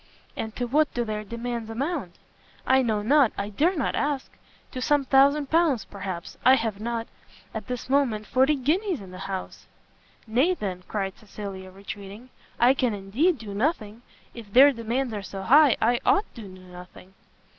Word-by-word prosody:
"And 220 -1 -5
to 245 - -2
what 295 +5 +2
do 240 -1 0
their 215 -1 -4
demands 235 +1 -5
amount?" 255 - -3 0.5
"I 265 0 +4
know 215 -4 0
not! 270 +1 +4
I 200 +1 -3
dare 320 - +1
not 285 - 0
ask! 285 -2 -2 0.4
to 255 - -5
some 290 +1 +2
thousand 280 +2 +3
pounds, 315 - +2
perhaps, 190 -4 -7
and 255 - +7
I - - +7
have 225 -5 -2
not, 230 0 -3 0.5
at 220 -2 -6
this 250 -1 -5
minute, 255 -6 +1
forty 265 +6 +3
guineas 325 - 0
in 190 -2 -11
the 185 - -9
house!" 190 -1 -6 0.6
"Nay, 260 +11 +2
then," 185 - -4
cried 195 -3 -3
Cecilia, 195 -3 -8
retreating, 200 +5 -10 0.3
"I 245 +3 +6
can 250 -5 0
indeed 240 - +1
do 210 -3 -8
nothing! 220 -2 -2 0.3
if 225 -4 -11
their 270 +6 +8
demands 235 +1 -2
are 205 - -4
so 195 0 -7
high, 285 +4 +6
I 240 +2 +2
ought 410 +1 +3
to 235 - -10
do 205 - -9
nothing." 185 0 -13
235 Hz, 175 wpm, -25 LUFS, 200-270 Hz, 0.6 s, their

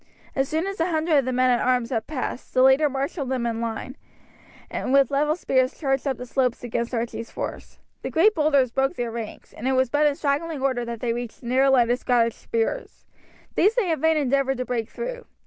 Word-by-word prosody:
As 270 0 0
soon 320 +3 0
as 390 -1 -5
a 330 - +2
hundred 315 -2 +2
of 270 - -1
the 255 - -1
men 255 0 +3
at 240 - +3
arms 250 -1 +1
had 225 -3 -2
passed, 265 -3 -5
their 255 - +5
leader 265 +3 +5
marshalled 275 +1 -3
them 255 -2 -1
in 230 -1 -2
line, 230 +3 -4 0.7
and - - -3
with 275 -1 +4
level 295 +2 +2
spears 260 -6 0
charged 270 -2 -1
up 265 -3 -1
the 250 - -7
slopes 250 -1 0
against 235 +1 -2
Archie's 230 0 -3
force. - - -6 0.2
The - - -4
great 400 +7 +4
boulders 285 - +2
broke 270 +6 0
their 240 -4 -3
ranks, 225 -2 -7
and 240 - -5
it 265 - +2
was 260 -1 +2
but 295 +1 +4
in 290 - +1
straggling 295 +2 -1
order 255 -3 +1
that 235 -1 -6
they 235 -2 0
reached 240 -1 -6
the 240 - -9
narrow 265 +2 +4
line 245 -3 +4
of 245 - +1
Scottish 235 -2 +2
spears. 225 -1 -3 0.5
These 415 +5 +3
they 415 -9 +1
in 320 - -1
vain 320 0 +3
endeavoured 275 -1 +1
to 255 - -3
break 235 -3 -2
through. - - -6
265 Hz, 230 wpm, -24 LUFS, 245-295 Hz, 0.7 s, their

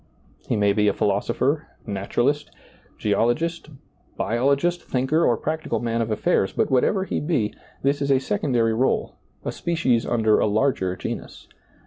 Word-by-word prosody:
He - - 0
may 100 -1 +3
be 105 0 +3
philosopher, 110 +9 0 0.2
naturalist, 120 +8 -1 0.5
geologist, 120 +11 0 0.5
biologist, 140 +9 +1
thinker, 135 +6 0
or 120 - +3
practical 155 -6 -2
man 115 0 -1
of 115 - -2
affairs, 105 -2 +1
but - - 0
whatever 190 +9 +2
he - - -2
be, 140 -10 0 0.3
this 140 +1 +1
is 140 - 0
a 135 - +5
sec 200 +10 -2
ondary 120 -5 +2
r61e, 130 +4 +1 0.3
a - - -1
species 160 -9 0
under 110 -2 +3
a - - +2
larger 105 -4 +1
genus. - - -6
125 Hz, 145 wpm, -23 LUFS, 110-150 Hz, 0.5 s, a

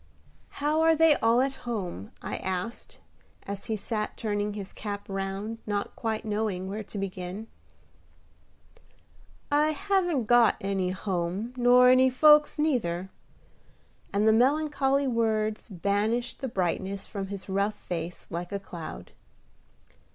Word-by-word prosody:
"How 300 +2 +1
are 325 0 +5
they 320 -1 +6
all 230 +2 +3
at 270 0 0 0.2
home?" 180 - -4
I - - -3
asked, 190 +5 -4 0.4
as 200 0 -6
he 220 - -1
sat 215 +1 -3
turning 205 -2 -1
his 200 -2 -6
cap 205 -1 -5
round, 195 +3 -4
not 205 -1 -2
quite 225 -1 -3
knowing 210 -3 -1
where 205 +3 -4
to 205 0 -9
begin. 190 +1 -5 2.1
"I 300 +2 +3
haven't 370 - +1
got 240 -1 +5
any 195 -2 -1
home 185 +4 -2
nor 250 0 +6
any 260 +1 +6
folks 300 +3 +5
neither;" 190 - 0 1.0
and 205 +2 +2
the 220 - +6
melancholy 275 +2 +2
words 220 -3 0
banished 205 +6 -1
the 265 - -2
brightness 190 -1 -2
from 195 -2 -5
his 195 -1 -7
rough 200 +2 0
face 175 -3 -5
like 175 +2 -4
a 200 - -2
cloud. 170 -5 -8
215 Hz, 130 wpm, -28 LUFS, 195-250 Hz, 2.1 s, they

